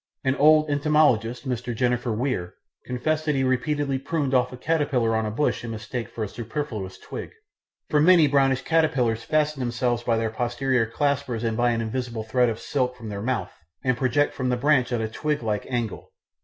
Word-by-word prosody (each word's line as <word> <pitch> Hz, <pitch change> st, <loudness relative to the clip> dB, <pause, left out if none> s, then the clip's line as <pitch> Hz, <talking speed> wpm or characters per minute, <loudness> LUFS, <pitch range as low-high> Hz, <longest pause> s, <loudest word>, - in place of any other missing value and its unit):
An 130 Hz, -, +2 dB
old 155 Hz, +1 st, +5 dB
entomologist, 145 Hz, -5 st, +2 dB
Mr. 125 Hz, -1 st, -3 dB
Jenner 125 Hz, 0 st, +1 dB
Weir, 110 Hz, -6 st, -2 dB, 0.3 s
confessed 155 Hz, +5 st, -1 dB
that 150 Hz, -2 st, +1 dB
he 135 Hz, -, +1 dB
repeatedly 135 Hz, +1 st, 0 dB
pruned 140 Hz, -1 st, -2 dB
off 125 Hz, -1 st, +3 dB
a 125 Hz, -, -8 dB
caterpillar 140 Hz, -6 st, +1 dB
on 110 Hz, -1 st, 0 dB
a -, -, -1 dB
bush 120 Hz, +5 st, -1 dB
in 120 Hz, -, -5 dB
mistake 115 Hz, +2 st, -5 dB
for 115 Hz, -, -5 dB
a -, -, -2 dB
superfluous 115 Hz, -4 st, -5 dB
twig, -, -, -7 dB, 0.6 s
for 150 Hz, -, +2 dB
many 170 Hz, 0 st, +6 dB
brownish 135 Hz, -2 st, +2 dB
caterpillars 130 Hz, -9 st, +1 dB
fasten 150 Hz, +1 st, 0 dB
themselves 120 Hz, -1 st, 0 dB
by 115 Hz, -1 st, +1 dB
their 115 Hz, -1 st, -1 dB
posterior 120 Hz, +1 st, 0 dB
claspers 140 Hz, -2 st, -1 dB
and 115 Hz, -1 st, 0 dB
by 120 Hz, +1 st, +2 dB
an 115 Hz, -1 st, 0 dB
invisible 115 Hz, 0 st, -3 dB
thread 125 Hz, +2 st, +2 dB
of 110 Hz, 0 st, -4 dB
silk 125 Hz, -3 st, -1 dB
from 115 Hz, -3 st, -8 dB
their 100 Hz, -1 st, -5 dB
mouth, 115 Hz, -6 st, -2 dB, 0.3 s
and 130 Hz, -1 st, +2 dB
project 135 Hz, +3 st, +1 dB
from 130 Hz, -1 st, -2 dB
the 125 Hz, -, +1 dB
branch 130 Hz, -2 st, +2 dB
at 120 Hz, -2 st, 0 dB
a 110 Hz, -, -1 dB
twig 150 Hz, +4 st, -2 dB
like 105 Hz, -2 st, -2 dB
angle. 120 Hz, -4 st, -3 dB
125 Hz, 195 wpm, -25 LUFS, 115-145 Hz, 0.6 s, many